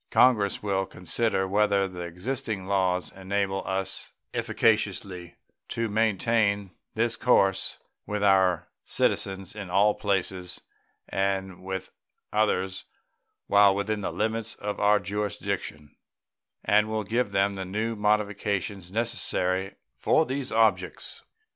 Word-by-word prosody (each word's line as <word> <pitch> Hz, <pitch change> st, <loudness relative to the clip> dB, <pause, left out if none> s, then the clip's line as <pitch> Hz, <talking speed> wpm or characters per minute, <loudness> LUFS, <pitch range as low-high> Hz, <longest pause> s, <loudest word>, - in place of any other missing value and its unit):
Congress 105 Hz, -7 st, +3 dB
will 95 Hz, -2 st, 0 dB
consider 95 Hz, +3 st, 0 dB
whether 100 Hz, 0 st, +2 dB
the 90 Hz, -1 st, -8 dB
existing 100 Hz, +4 st, -3 dB
laws 95 Hz, -2 st, +1 dB
enable 95 Hz, 0 st, -2 dB
us 95 Hz, 0 st, -2 dB, 0.2 s
efficaciously 100 Hz, -5 st, 0 dB, 0.3 s
to 115 Hz, -1 st, -2 dB
maintain 105 Hz, -2 st, +1 dB, 0.2 s
this 115 Hz, +1 st, +2 dB
course 95 Hz, -6 st, +2 dB, 0.3 s
with 105 Hz, 0 st, -2 dB
our 95 Hz, -4 st, +3 dB, 0.2 s
citizens 95 Hz, 0 st, -1 dB
in 100 Hz, -4 st, -6 dB
all 100 Hz, +3 st, +4 dB
places 95 Hz, -3 st, -1 dB, 0.5 s
and 95 Hz, -2 st, -2 dB
with 95 Hz, -1 st, -5 dB, 0.4 s
others 95 Hz, -3 st, 0 dB, 0.6 s
while 100 Hz, -1 st, +5 dB
within 105 Hz, +1 st, -1 dB
the -, -, -2 dB
limits 110 Hz, +1 st, -2 dB
of 105 Hz, 0 st, -4 dB
our 105 Hz, 0 st, +4 dB
jurisdiction, 100 Hz, -6 st, -4 dB, 0.7 s
and 105 Hz, +1 st, +4 dB
will 110 Hz, 0 st, -1 dB
give 115 Hz, +5 st, 0 dB
them 100 Hz, +1 st, +2 dB
the 95 Hz, -1 st, -4 dB
new 110 Hz, +5 st, -2 dB
modifications 100 Hz, -3 st, -1 dB
necessary 95 Hz, -4 st, 0 dB, 0.2 s
for 160 Hz, -, +2 dB
these 135 Hz, -1 st, -3 dB
objects. 110 Hz, -5 st, +1 dB
100 Hz, 115 wpm, -27 LUFS, 95-105 Hz, 0.7 s, while